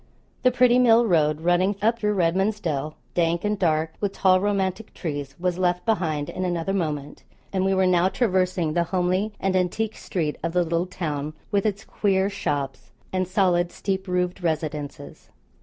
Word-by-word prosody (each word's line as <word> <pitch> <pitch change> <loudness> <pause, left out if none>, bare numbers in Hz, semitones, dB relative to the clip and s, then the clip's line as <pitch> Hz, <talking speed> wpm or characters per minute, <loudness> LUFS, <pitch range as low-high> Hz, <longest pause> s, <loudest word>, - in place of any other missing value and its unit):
The 255 - +5
pretty 250 0 +4
mill 235 -1 +5
road, 155 -6 +2
running 175 +4 +2
up 225 +3 +1
through 210 -1 0
Redman's 190 +4 +1
Dell, 155 -4 -3 0.2
dank 170 0 +1
and 210 -1 0
dark 160 -2 +1
with 200 -1 -1
tall 185 -1 +3
romantic 200 +1 -1
trees, 145 -5 -5
was 180 0 -1
left 180 -1 +1
behind 160 -10 0
in 185 - -4
another 175 +1 -1
moment; 150 -6 -3 0.3
and 190 -1 +1
we 195 0 +2
were 190 0 +3
now 180 0 +3
traversing 185 -7 +1
the 170 +1 +1
homely 185 +4 0
and 190 -1 0
antique 205 +4 0
street 155 -5 -3
of 165 0 -2
the 180 0 +3
little 170 +2 -1
town, 155 -4 -4 0.2
with 200 +1 +2
its 200 -1 -3
queer 195 -1 +1
shops 145 -8 -3 0.2
and 185 -1 0
solid 180 -2 +2
steep 190 0 -3
roofed 180 0 -1
residences. 155 -3 -4
180 Hz, 175 wpm, -24 LUFS, 165-195 Hz, 0.3 s, The